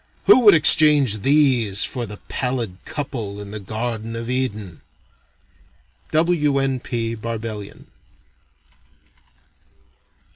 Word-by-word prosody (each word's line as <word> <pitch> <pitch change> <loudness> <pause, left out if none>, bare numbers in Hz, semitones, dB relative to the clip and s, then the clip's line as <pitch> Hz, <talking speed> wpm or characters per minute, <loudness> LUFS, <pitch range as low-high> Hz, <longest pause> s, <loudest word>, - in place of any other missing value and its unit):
Who 395 - +7
would 205 - +8
exchange 150 -7 +5
these 130 -7 +2
for 120 -3 -5
the 105 0 -9
pallid 125 -7 -3
couple 120 -9 -6
in 100 -1 -9
the 110 - -6
Garden 110 +2 -5
of 115 +1 -5
Eden?" 110 -9 -4 1.3
W. 155 -3 +1
N. 135 -1 -1
P. 115 -2 -4
Barbellion. 110 -2 -7
115 Hz, 100 wpm, -20 LUFS, 110-140 Hz, 1.3 s, would